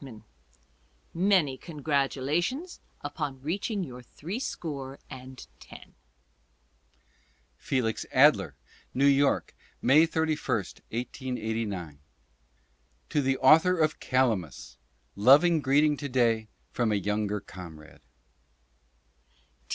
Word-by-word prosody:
i 115 Hz, -6 st, -11 dB, 0.5 s
— -, -, -38 dB
Many 175 Hz, -7 st, +2 dB
congratulations 155 Hz, -, -2 dB, 0.2 s
upon 145 Hz, -2 st, -4 dB
reaching 195 Hz, +5 st, -2 dB
your 125 Hz, -6 st, -8 dB
three 170 Hz, -, -7 dB
score 140 Hz, -, -5 dB
and 130 Hz, -1 st, -10 dB
ten. -, -, -14 dB, 1.6 s
Felix 120 Hz, -5 st, -1 dB
Adler: 100 Hz, -, +4 dB, 0.4 s
New 135 Hz, +2 st, +3 dB
York, 140 Hz, 0 st, +3 dB, 0.3 s
May 150 Hz, +6 st, +5 dB
31, 160 Hz, -2 st, 0 dB, 0.3 s
1889. 110 Hz, -, -4 dB, 1.1 s
To 145 Hz, -, +1 dB
the 135 Hz, -1 st, +1 dB
author 160 Hz, +7 st, +5 dB
of 155 Hz, -1 st, +1 dB
"Calamus," 110 Hz, -, -1 dB, 0.4 s
loving 145 Hz, -, +5 dB
greeting 145 Hz, +2 st, +3 dB
to 140 Hz, 0 st, -5 dB
day 115 Hz, -4 st, +1 dB, 0.2 s
from 120 Hz, -3 st, 0 dB
a -, -, +2 dB
younger 105 Hz, +1 st, -1 dB
comrade. 85 Hz, -6 st, -12 dB
135 Hz, 95 wpm, -28 LUFS, 110-155 Hz, 1.6 s, May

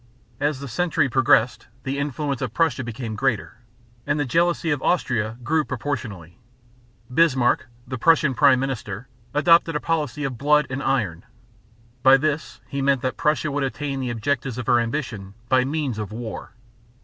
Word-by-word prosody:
As 145 Hz, -1 st, 0 dB
the 140 Hz, -, -6 dB
century 160 Hz, +2 st, +1 dB
progressed, 125 Hz, -1 st, +3 dB, 0.2 s
the 135 Hz, +1 st, -2 dB
influence 140 Hz, -1 st, -2 dB
of -, -, -4 dB
Prussia 160 Hz, -5 st, +1 dB
became 115 Hz, -1 st, -5 dB
greater; 115 Hz, -2 st, -1 dB, 0.5 s
and 145 Hz, +1 st, +1 dB
the 145 Hz, -, +1 dB
jealousy 170 Hz, +4 st, +1 dB
of 145 Hz, -3 st, -1 dB
Austria 115 Hz, -10 st, 0 dB
grew 155 Hz, +4 st, +1 dB
proportionately. 105 Hz, -, -5 dB, 0.7 s
Bismarck, 130 Hz, -7 st, +3 dB, 0.2 s
the 130 Hz, -2 st, -5 dB
Prussian 160 Hz, -1 st, +4 dB
prime 130 Hz, +1 st, +5 dB
minister, 120 Hz, -4 st, -4 dB, 0.3 s
adopted 165 Hz, +1 st, +4 dB
a -, -, +1 dB
policy 150 Hz, -4 st, -2 dB
of 130 Hz, -4 st, -3 dB
"blood 150 Hz, +1 st, +4 dB
and 135 Hz, +1 st, -3 dB
iron." 110 Hz, -11 st, -1 dB, 0.8 s
By 135 Hz, +1 st, +7 dB
this 140 Hz, -5 st, -2 dB
he 140 Hz, -, -3 dB
meant 135 Hz, -2 st, +2 dB
that 130 Hz, -, -1 dB
Prussia 155 Hz, -2 st, 0 dB
would 140 Hz, 0 st, -1 dB
attain 135 Hz, +2 st, -3 dB
the 130 Hz, -2 st, -2 dB
objects 125 Hz, +1 st, -2 dB
of 125 Hz, -, -4 dB
her 120 Hz, -, +4 dB
ambition 115 Hz, -5 st, -4 dB
by 130 Hz, -1 st, +4 dB
means 140 Hz, -5 st, -2 dB
of 105 Hz, -1 st, -5 dB
war. 110 Hz, -3 st, -7 dB
135 Hz, 160 wpm, -23 LUFS, 120-150 Hz, 0.8 s, By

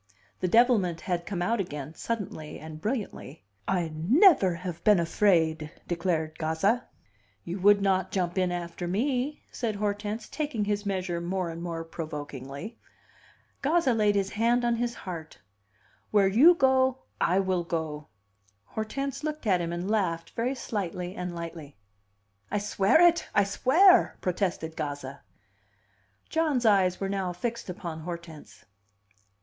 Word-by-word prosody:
The 185 Hz, -, 0 dB
devilment 210 Hz, -6 st, +3 dB
had 175 Hz, -2 st, -2 dB
come 180 Hz, -4 st, -2 dB
out 230 Hz, +5 st, +1 dB
again, 150 Hz, -5 st, -4 dB
suddenly 175 Hz, -7 st, -5 dB
and 155 Hz, 0 st, -9 dB
brilliantly: 210 Hz, -, -4 dB, 0.2 s
"I 175 Hz, -4 st, 0 dB
never 200 Hz, -, +5 dB
have 170 Hz, -1 st, -6 dB
been 210 Hz, -4 st, +5 dB
afraid!" 160 Hz, -3 st, +2 dB, 0.2 s
declared 165 Hz, -3 st, -1 dB
Gazza. 180 Hz, +10 st, +1 dB, 0.6 s
"You 180 Hz, +3 st, -5 dB
would 200 Hz, +1 st, +5 dB
not 190 Hz, -1 st, +2 dB
jump 180 Hz, -3 st, -1 dB
in 185 Hz, -2 st, +1 dB
after 175 Hz, 0 st, -4 dB
me," 255 Hz, +8 st, -1 dB
said 225 Hz, -3 st, -2 dB
Hortense, 205 Hz, +1 st, -3 dB
taking 290 Hz, -9 st, -2 dB
his 205 Hz, 0 st, -1 dB
measure 185 Hz, -3 st, -2 dB
more 180 Hz, 0 st, -2 dB
and 165 Hz, +1 st, -7 dB
more 165 Hz, -1 st, -4 dB
provokingly. 150 Hz, -, -7 dB, 0.8 s
Gazza 295 Hz, -2 st, +2 dB
laid 210 Hz, -2 st, +2 dB
his 195 Hz, -1 st, 0 dB
hand 240 Hz, +3 st, +2 dB
on 235 Hz, -1 st, +1 dB
his 240 Hz, 0 st, -2 dB
heart. 165 Hz, -4 st, -7 dB, 0.7 s
"Where 205 Hz, -2 st, +4 dB
you 275 Hz, -, +7 dB
go, 260 Hz, -3 st, +2 dB, 0.2 s
I 180 Hz, +3 st, +3 dB
will 185 Hz, -2 st, 0 dB
go!" 160 Hz, -3 st, -4 dB, 0.6 s
Hortense 275 Hz, -, -4 dB
looked 305 Hz, -3 st, -4 dB
at 185 Hz, -4 st, +3 dB
him, 170 Hz, 0 st, -3 dB
and 175 Hz, +2 st, -3 dB
laughed 185 Hz, -6 st, -1 dB
very 245 Hz, +4 st, -1 dB
slightly 185 Hz, -6 st, -4 dB
and 180 Hz, -1 st, -4 dB
lightly. 165 Hz, -5 st, -8 dB, 0.7 s
"I 210 Hz, -, 0 dB
swear 205 Hz, +5 st, +3 dB
it! 345 Hz, -1 st, +5 dB
I 200 Hz, -, +5 dB
swear!" 330 Hz, -, +4 dB
protested 180 Hz, -3 st, -2 dB
Gazza. 145 Hz, -3 st, -5 dB, 1.1 s
John's 305 Hz, -7 st, +1 dB
eyes 190 Hz, -4 st, +4 dB
were 195 Hz, -, -1 dB
now 195 Hz, -2 st, -2 dB
fixed 235 Hz, +4 st, -4 dB
upon 170 Hz, -3 st, -5 dB
Hortense. 160 Hz, -, -9 dB
190 Hz, 140 wpm, -28 LUFS, 170-225 Hz, 1.1 s, you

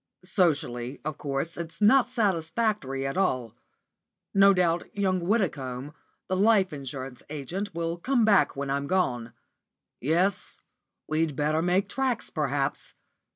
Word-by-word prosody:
Socially, 145 Hz, -9 st, 0 dB
of 155 Hz, -2 st, -4 dB
course, 140 Hz, +4 st, -3 dB
it's 165 Hz, -1 st, -7 dB
not 240 Hz, +4 st, +5 dB
satisfactory 190 Hz, -, 0 dB
at 135 Hz, +5 st, -3 dB
all. 130 Hz, -, 0 dB, 0.8 s
No 195 Hz, 0 st, +7 dB
doubt 175 Hz, -3 st, +1 dB
young 190 Hz, -2 st, +1 dB
Widdicombe, 150 Hz, -, -1 dB, 0.3 s
the 185 Hz, -, 0 dB
life 195 Hz, -3 st, +3 dB
insurance 135 Hz, -2 st, -7 dB
agent, 165 Hz, +7 st, -5 dB
will 165 Hz, 0 st, -2 dB
come 240 Hz, +5 st, +2 dB
back 205 Hz, -3 st, +4 dB
when 140 Hz, 0 st, -3 dB
I'm 140 Hz, 0 st, -1 dB
gone. 125 Hz, -11 st, 0 dB, 0.7 s
Yes, 180 Hz, +8 st, 0 dB, 0.5 s
we'd 155 Hz, -1 st, 0 dB
better 150 Hz, +3 st, +1 dB
make 180 Hz, +3 st, +2 dB
tracks, 265 Hz, -3 st, -2 dB
perhaps. 145 Hz, -2 st, -2 dB
165 Hz, 125 wpm, -27 LUFS, 140-195 Hz, 0.8 s, No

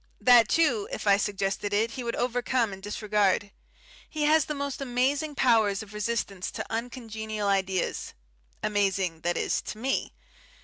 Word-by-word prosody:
That, 240 Hz, -3 st, +6 dB
too, 255 Hz, -11 st, +2 dB
if -, -, -5 dB
I 200 Hz, -1 st, +5 dB
suggested 200 Hz, 0 st, -2 dB
it, 225 Hz, +2 st, +1 dB
he 250 Hz, -, -5 dB
would 235 Hz, 0 st, -2 dB
overcome 245 Hz, -2 st, 0 dB
and 190 Hz, -, -9 dB
disregard. 205 Hz, -1 st, 0 dB, 0.6 s
He 305 Hz, -1 st, -2 dB
has 310 Hz, +1 st, +4 dB
the 300 Hz, -, -4 dB
most 280 Hz, -1 st, -4 dB
amazing 275 Hz, +4 st, 0 dB
power 230 Hz, -5 st, +4 dB
of 200 Hz, +1 st, -5 dB
resistance 210 Hz, -3 st, -2 dB
to -, -, -4 dB
uncongenial 220 Hz, -3 st, -4 dB
ideas; 190 Hz, -2 st, -1 dB, 0.5 s
amazing 195 Hz, -5 st, 0 dB
that 175 Hz, +1 st, 0 dB
is, -, -, 0 dB
to 190 Hz, -, -7 dB
me. 260 Hz, +4 st, -1 dB
220 Hz, 150 wpm, -27 LUFS, 200-250 Hz, 0.6 s, That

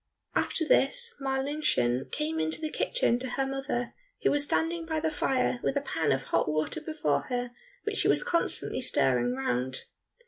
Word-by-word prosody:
After 320 Hz, -, +2 dB
this 470 Hz, -, +3 dB
Marlinchen 265 Hz, -, 0 dB
came 160 Hz, +1 st, -2 dB
into 160 Hz, 0 st, +1 dB
the 310 Hz, -1 st, -3 dB
kitchen -, -, +1 dB
to 260 Hz, 0 st, -3 dB
her 270 Hz, +2 st, -1 dB
mother, 270 Hz, -3 st, -3 dB, 0.3 s
who -, -, +4 dB
was 290 Hz, 0 st, +2 dB
standing 330 Hz, +3 st, 0 dB
by 320 Hz, -1 st, -2 dB
the 320 Hz, 0 st, 0 dB
fire 260 Hz, -4 st, 0 dB
with 280 Hz, -, 0 dB
a -, -, +1 dB
pan 165 Hz, -, -1 dB
of 135 Hz, 0 st, +1 dB
hot -, -, 0 dB
water 155 Hz, -, -1 dB
before 310 Hz, -1 st, -1 dB
her 245 Hz, -1 st, -2 dB, 0.3 s
which 425 Hz, -1 st, -2 dB
she -, -, +3 dB
was -, -, +4 dB
constantly 340 Hz, -, 0 dB
stirring 125 Hz, -1 st, +3 dB
round. 130 Hz, 0 st, -1 dB
270 Hz, 175 wpm, -29 LUFS, -, 0.3 s, who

